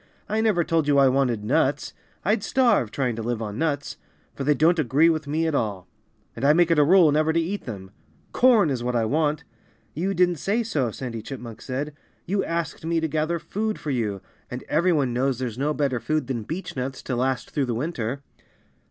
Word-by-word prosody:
"I 220 +1 0
never 210 -6 +2
told 165 -2 0
you 145 -1 +3
I 135 -1 +6
wanted 125 -5 +1
nuts. 135 +5 0 0.3
I'd 210 +2 +2
starve, 235 - +2
trying 125 -1 -1
to - - -3
live 120 0 -2
on 105 0 -5
nuts; 145 -4 -2 0.4
for 140 - -5
they 150 +2 +3
don't 165 +3 +3
agree 150 +4 +4
with 155 -2 -3
me 155 +3 0
at 160 - 0
all. 100 -8 -2 0.5
And - - -7
I 145 +2 +6
make 170 +1 +3
it 165 - +4
a - - +7
rule 170 0 +6
never 155 +2 +2
to 165 - +1
eat 185 +5 -3
them. 95 -5 -7 0.4
Corn 230 - +4
is 125 -3 -2
what 125 0 -1
I 115 -1 +2
want." 150 +4 0 0.5
"You 190 +5 -2
didn't 175 -1 +3
say 210 +10 0
so," 145 - -1
Sandy 115 0 -6
Chipmunk 120 -2 -8
said. 140 +3 -4 0.3
"You 195 +2 0
asked 165 -2 -3
me 165 0 0
to 160 - -1
gather 155 +3 -1
food 215 +6 -3
for 150 - -4
you. 105 -7 -2 0.3
And 125 +1 -6
every 170 +5 +1
one 140 -7 +1
knows 130 +1 0
there's 125 -2 -4
no 145 +2 +1
better 140 -4 0
food 155 +2 -1
than 120 -4 -4
beechnuts 135 - -5
to 125 - -3
last 130 +1 -1
through 140 -3 -1
the 120 - -1
winter." 135 -1 -3
145 Hz, 215 wpm, -24 LUFS, 125-165 Hz, 0.5 s, a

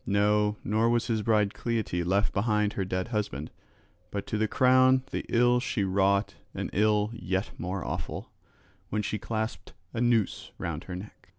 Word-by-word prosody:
No, 105 +1 +2
nor 110 +2 +2
was 120 -1 +2
his 110 -2 0
bride 105 -1 +2
Cleite 110 -7 -1
left 100 +4 +1
behind 105 0 +1
her 95 - -1
dead 95 +2 -2
husband, 105 - -3 0.6
but 100 +1 -4
to 110 0 0
crown 130 +2 +5
the - - -2
ill 120 +1 +4
she 120 -4 -1
wrought 100 +1 +2 0.2
an - - -3
ill 105 +1 +2
yet 95 -2 -2
more 90 +1 -3
awful, - - -5 0.6
when 105 0 -1
she 105 - -2
clasped 110 0 -4 0.2
a 115 - -2
noose 120 -4 +1
round 85 0 -4
her 90 - -6
neck. 95 +4 -10
105 Hz, 165 wpm, -28 LUFS, 100-115 Hz, 0.6 s, crown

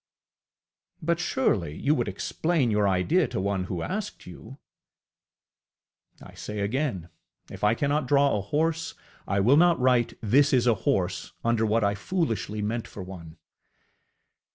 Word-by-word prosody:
ŌĆ£But 170 0 +1
surely 85 - 0
you 145 - +1
would 120 -7 -1
explain 135 - -1
your 105 -1 +2
idea 120 - +2
to - - -4
one 95 -1 -1
who 90 -2 -4
asked 205 +2 -5
you? 110 +9 -11 1.6
ŌĆØ - - -13
I - - -21
say 105 0 -6
again, 100 - -2 0.4
if - - -10
I 105 +2 +4
cannot 145 +1 0
draw 140 -1 +3
a 105 - -1
horse, 160 +10 -1 0.3
I 100 0 0
will 125 +9 +5
not 175 +1 +4
write 125 -2 +2
THIS 135 +7 +3
IS 125 -2 +3
A 120 - +5
HORSE 105 - -1
under 115 -1 +1
what 110 +1 +1
I 100 0 +2
foolishly 110 - -2
meant 115 +2 -2
for 100 - -8
one. 85 -4 -10
115 Hz, 155 wpm, -26 LUFS, 100-145 Hz, 1.6 s, will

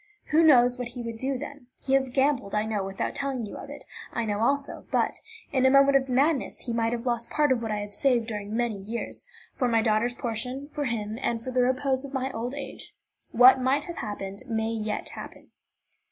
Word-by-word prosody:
Who 310 +2 +5
knows 250 -5 +6
what 245 - -2
he 240 0 -7
would 230 -1 -6
do 265 +1 0
then! 280 0 -8 0.2
He 270 - +1
has 270 -1 +3
gambled, 265 -5 +1
I 210 +1 +1
know; 215 -3 -1
without 195 0 -3
telling 270 -4 -2
you 205 - -8
of - - -9
it, - - -9 0.3
I 235 - -2
know 205 -1 -1
also, 275 +5 0
but, - - 0 0.3
in 265 -2 +2
a 260 - +6
moment 275 +1 +6
of 270 -1 +3
madness, 275 +3 +1
he 235 - -4
might 230 0 +1
have 240 0 -3
lost 235 -2 -1
part 295 -2 +2
of 250 -3 +2
what 225 - -3
I 210 -1 -1
have 205 0 -7
saved, 240 +1 +3
during 210 -1 -5
many 235 -4 -1
years, 225 - -5 0.3
for 255 - 0
my 230 -2 +3
daughter's 225 +2 +1
portion, 250 +3 -4
for 295 -1 -3
him, 220 -2 -3
and 235 -3 0
for 255 +3 -6
the 255 0 +2
repose 260 +1 +1
of 280 0 -7
my 265 0 -1
old 245 +3 -4
age. 270 -2 -8 0.4
What 255 +2 +7
might 270 +3 +2
have 340 +1 -8
happened 200 -2 -5
may 225 -1 -1
yet 215 -1 -3
happen. - - -10
245 Hz, 225 wpm, -27 LUFS, 225-270 Hz, 0.4 s, What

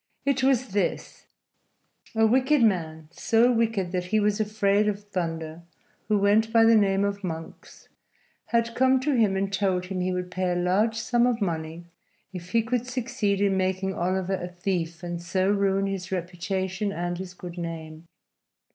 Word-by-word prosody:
It 275 -2 +1
was 260 -2 +2
this: 200 +1 -3 0.9
A 220 0 +4
wicked 260 +4 +3
man 160 -7 0
so 230 +7 +3
wicked 225 -6 0
that 180 -1 -2
he 215 +4 +1
was 210 0 +1
afraid 210 -1 +1
of 205 0 -2
thunder 165 -4 -4 0.5
who 215 - +2
went 210 +3 +3
by 230 0 +5
the 225 - +6
name 195 -2 +3
of 200 0 -3
Monks, 165 -2 -8 0.6
had 230 0 0
come 260 +1 +3
to 290 +2 0
him 215 -6 +2
and 195 0 -2
told 190 -2 0
him 185 0 -4
he 185 +1 0
would 180 0 -3
pay 185 -1 -1
a - - -2
large 190 +6 +1
sum 240 +1 +2
of 240 -2 0
money 165 -3 -3 0.5
if 180 -1 -8
he 230 +3 +2
could 245 +1 -2
succeed 245 -5 -1
in 200 -1 +2
making 190 0 -1
Oliver 185 +2 -1
a 180 -2 -3
thief 180 -2 -3
and 175 -1 -4
so 185 +3 0
ruin 195 -1 +1
his 195 -2 -4
reputation 185 +2 -2
and 175 -1 -3
his 185 -1 -7
good 175 -1 -8
name. 165 -1 -7
195 Hz, 175 wpm, -26 LUFS, 180-220 Hz, 0.9 s, the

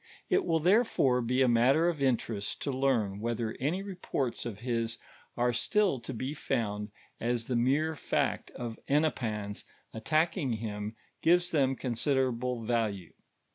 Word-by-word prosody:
It - - +3
will, 165 -2 +2
therefore, 175 - +3
be 125 +3 +2
a - - +4
matter 130 +8 +4
of 165 -5 -1
interest 115 -6 0
to 140 - -1
learn 125 -7 +1
whether 115 0 -2
any 165 +9 -1
reports 175 -11 -3
of 110 -4 -6
his 115 -2 -1 0.4
are 120 0 +2
still 200 - +2
to 120 - -7
be 130 +4 -3
found, 105 -7 -2 0.3
as 120 0 -1
the 125 - -1
mere 140 +7 +2
fact - - -1
of 115 -2 -5
Hennepin's 115 -9 0 0.3
attacking 155 - +1
him 105 -1 -4 0.3
gives 175 +1 +4
them 135 -4 +2
considerable 125 -1 0
value. 110 -6 -1
125 Hz, 140 wpm, -30 LUFS, 115-145 Hz, 0.4 s, a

